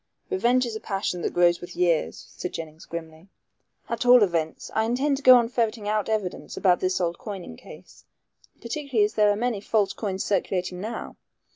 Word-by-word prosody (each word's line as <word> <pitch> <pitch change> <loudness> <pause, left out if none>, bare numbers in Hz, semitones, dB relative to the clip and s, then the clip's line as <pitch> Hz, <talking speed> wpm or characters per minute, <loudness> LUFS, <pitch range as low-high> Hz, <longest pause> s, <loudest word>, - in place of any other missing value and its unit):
"Revenge 255 -9 +2
is 230 -2 -5
a - - -4
passion 195 -4 -3
that - - -1
grows 175 -1 +4
with 175 - -9
years," 170 -3 0
said 180 - -5
Jennings 160 -1 -8
grimly; 165 +1 -8 0.6
"at 230 0 -2
all 245 -2 +7
events, 165 -4 -2
I 220 - +1
intend 270 +5 +1
to - - -7
go 255 -2 +9
on 240 -2 +4
ferreting 230 -3 -1
out 215 0 0
evidence 210 -5 -3
about 180 -2 +3
this 185 0 0
old 170 -1 -1
coining 195 - -7
case, - - -15 0.6
particularly 245 -3 0
as 210 - -4
there 210 -1 +4
are 205 - +2
many 230 -2 -1
false 210 -2 +1
coins 195 -3 -3
circulating 180 -2 -1
now. 220 +3 -6
205 Hz, 185 wpm, -25 LUFS, 180-235 Hz, 0.6 s, go